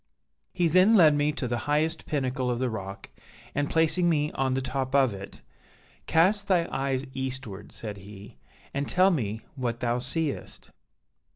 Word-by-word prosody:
"He 180 -2 +1
then 185 +7 +5
led 160 -7 +7
me 145 +1 +2
to 140 -4 -3
the 120 0 -1
highest 155 +2 0
pinnacle 130 -3 -1
of 120 - 0
the 125 -1 -1
rock, 95 -2 -7 0.4
and 145 0 -1
placing 165 +2 +2
me 150 -2 +1
on 130 -1 0
the - - +1
top 130 0 -2
of 135 -5 +4
it, 100 0 -10 0.6
'Cast 200 +5 +3
thy 175 -3 +3
eyes 135 0 -1
eastward,' 130 -6 -5
said 105 -2 -7
he, 100 -6 -12 0.3
'and 140 +1 -2
tell 185 +2 +4
me 110 - -2
what 120 -3 -2
thou 120 0 0
seest.' 140 +4 -4
135 Hz, 165 wpm, -27 LUFS, 120-160 Hz, 0.6 s, led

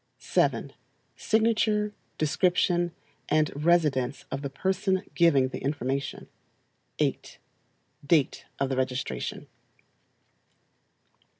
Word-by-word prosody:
7. - - 0 0.4
Signature, 215 -1 +1 0.2
description, 175 +2 +2 0.4
and 155 0 +3
residence 150 -7 +2
of 135 - -3
the 140 - -3
person 190 +6 0
giving 145 -7 +4
the - - -5
information. 140 -1 -2 0.7
8 - - -1 0.7
Date 150 -3 +2
of 135 - 0
the 135 - -1
registration. 125 - -2
155 Hz, 85 wpm, -27 LUFS, 135-185 Hz, 0.7 s, giving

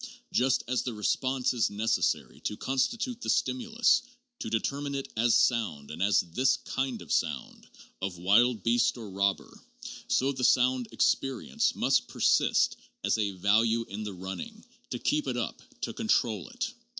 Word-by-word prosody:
Just 130 0 +2
as 125 0 0
the 125 -3 -4
'response' 130 +5 0
is 120 -3 +1
necessary 105 +2 0
to 105 - -4
constitute 225 - -1
the - - -4
stimulus, 235 -2 +2 0.4
to - - -4
determine 140 +5 -2
it 135 - -4
as 115 0 +3
sound 105 - +1
and 80 +3 -7
as 100 +1 +4
this 125 +10 +1
kind 130 -7 -3
of 80 - -10
sound, - - -2 0.3
of 95 -2 -3
wild 105 +4 +3
beast 120 +1 +2
or 110 -4 -8
robber, 100 +1 -1 0.5
so 135 +2 +2
the 130 -2 -5
sound 125 -1 +3
experience 135 -2 0
must - - +2
persist - - +2 0.3
as - - +1
a 100 -2 0
value 110 +5 +2
in 105 +2 -5
the 105 -2 -5
running, 95 - -7 0.2
to - - -3
keep 300 0 0
it - - -1
up, - - -3 0.2
to - - -3
control 125 - 0
it. 245 +1 -4
120 Hz, 160 wpm, -29 LUFS, 105-135 Hz, 0.5 s, as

